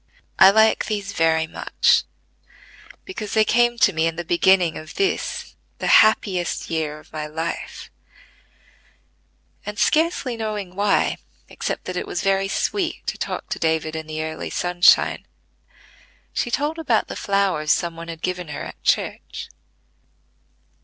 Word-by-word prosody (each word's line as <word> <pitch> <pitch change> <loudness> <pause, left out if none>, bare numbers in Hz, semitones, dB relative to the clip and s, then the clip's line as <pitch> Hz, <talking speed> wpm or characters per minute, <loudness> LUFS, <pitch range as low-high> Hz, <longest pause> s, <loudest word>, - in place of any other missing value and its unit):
"I 190 - +10
like 220 +2 +4
these 205 -1 -3
very 160 -1 +2
much, 160 - +1 1.0
because 220 - -6
they 215 0 +4
came 240 +2 +3
to 195 - +4
me 160 0 +1
in 165 - -2
the 175 - -4
beginning 175 0 +3
of 155 - -9
this, 395 +1 -2 0.2
the - - -5 0.2
happiest 195 -7 0
year 155 -2 -2
of 150 - -18
my 155 -1 -4
life;" 160 +2 -5 1.7
and 210 0 -6
scarcely 310 -5 +1
knowing 210 -5 -4
why, 200 +1 +1 0.3
except - - -4
that 185 0 -4
it - - -3
was 175 - -3
very 195 0 +2
sweet 345 - -2
to - - -4
talk - - -4
with - - -9
David 160 -1 0
in 160 -1 -5
the 155 0 -4
early 160 0 -5
sunshine, 175 0 +3 1.1
she - - -1
told 295 +6 -1
about 255 -9 +1
the - - -6
flowers 195 -7 0
some 170 -1 0
one 165 0 -8
had 165 -1 -8
given 180 -1 -3
her 150 - -6
at - - -10
church. - - -1
185 Hz, 145 wpm, -22 LUFS, 160-215 Hz, 1.7 s, I